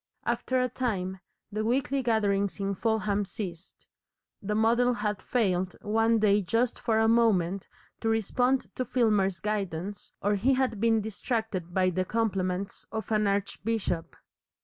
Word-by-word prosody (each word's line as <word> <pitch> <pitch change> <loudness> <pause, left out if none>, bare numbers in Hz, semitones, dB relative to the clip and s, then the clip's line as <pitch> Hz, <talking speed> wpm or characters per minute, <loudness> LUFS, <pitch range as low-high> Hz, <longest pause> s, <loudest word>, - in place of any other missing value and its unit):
After 260 0 0
a 250 - +2
time, 195 -7 -2 0.3
the 215 +1 -2
weekly 265 +4 +1
gatherings 200 -5 +1
in 200 0 -1
Fulham 210 0 0
ceased. 185 -3 -7 0.6
The 210 +1 -2
model 235 +3 +3
had 210 -2 -2
failed 185 -6 0
one 225 +2 +3
day 210 -1 +4
just 230 +6 0
for 225 -1 +1
a 225 0 +4
moment 200 -5 +2 0.3
to 225 - -1
respond 245 +4 +1
to 255 - +1
Filmer's 210 -8 +2
guidance, 200 -2 -3
or 205 +1 +1
he 260 +7 +3
had 255 -5 0
been 225 -1 +3
distracted 215 -4 -3
by 185 0 +2
the 185 +1 0
compliments 195 -3 -1
of 220 0 -4
an 210 -1 +2
archbishop. 200 -2 -2
210 Hz, 145 wpm, -28 LUFS, 195-230 Hz, 0.6 s, day